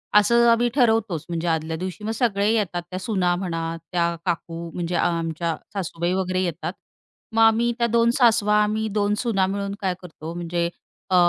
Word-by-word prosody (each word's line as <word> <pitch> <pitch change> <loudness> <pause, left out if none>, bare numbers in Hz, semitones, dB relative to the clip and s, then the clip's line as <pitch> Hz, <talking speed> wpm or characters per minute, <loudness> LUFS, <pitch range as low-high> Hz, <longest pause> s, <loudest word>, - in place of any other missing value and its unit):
असं 235 +3 +5
आम्ही 235 +1 +4
ठरवतोच. 220 - +2
म्हणजे 170 0 -2
आदल्या 160 -1 -1
दिवशी 185 +4 -6
मग 220 - -2
सगळे 210 -3 +1
येतात, 195 -6 0
त्या 185 0 -4
सुना 185 -4 +1
म्हणा, 165 -3 -3 0.2
त्या 170 -1 +1
काकू 170 -1 -3
म्हणजे 175 0 -3
अ, - - +2
आमच्या 165 -1 -1 0.2
सासूबाई 175 -2 -2
वगैरे 185 -1 0
येतात 170 0 -3 0.6
मग, 225 - +4
आम्ही 225 +1 +4
त्या 235 -1 +2
2 235 +1 +3
सासवा 220 -4 +4
आम्ही 215 +1 -1
2 205 0 +1
सुना 210 -6 +1
मिळून 200 0 -3
काय 190 -2 0
करतो 165 -2 -8
म्हणजे 170 0 -2 0.4
अ 185 - +2
185 Hz, 175 wpm, -23 LUFS, 170-220 Hz, 0.6 s, असं